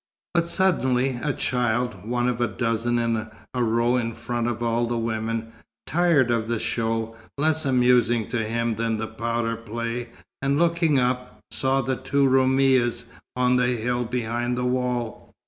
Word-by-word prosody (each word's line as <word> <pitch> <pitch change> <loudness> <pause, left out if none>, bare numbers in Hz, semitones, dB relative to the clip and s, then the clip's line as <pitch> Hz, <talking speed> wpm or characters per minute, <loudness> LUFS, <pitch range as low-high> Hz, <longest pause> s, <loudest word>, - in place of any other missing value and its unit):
But 170 -1 +2
suddenly 130 -10 +1
a 150 - 0
child 120 -6 -1
(one 120 0 +1
of 120 -1 -1
a 120 - +3
dozen 115 0 -1
in 115 -2 -1 0.2
a 125 -1 0
row 115 +2 +2
in 115 -1 -2
front 120 0 -3
of 120 -1 -2
all 120 0 +1
the 120 0 -1
women) 115 0 -2 0.3
tired 160 -8 +3
of 115 -1 0
the 115 0 0
show, 115 0 -2 0.2
less 155 +1 +1
amusing 125 -3 +3
to 115 -1 -1
him 115 0 -1
than 115 -1 0
the 110 - -2
powder 115 +1 -2
play, 115 +1 -4 0.3
and 140 +1 +1
looking 170 -2 +2
up, 125 0 -1
saw 135 +1 +1
the 130 +1 -1
two 140 +1 +1
Roumis 130 -2 +3 0.3
on 125 0 +3
the 125 0 +2
hill 120 +2 -1
behind 120 0 -2
the 125 - -1
wall. 125 -2 -2
120 Hz, 165 wpm, -24 LUFS, 115-130 Hz, 0.3 s, a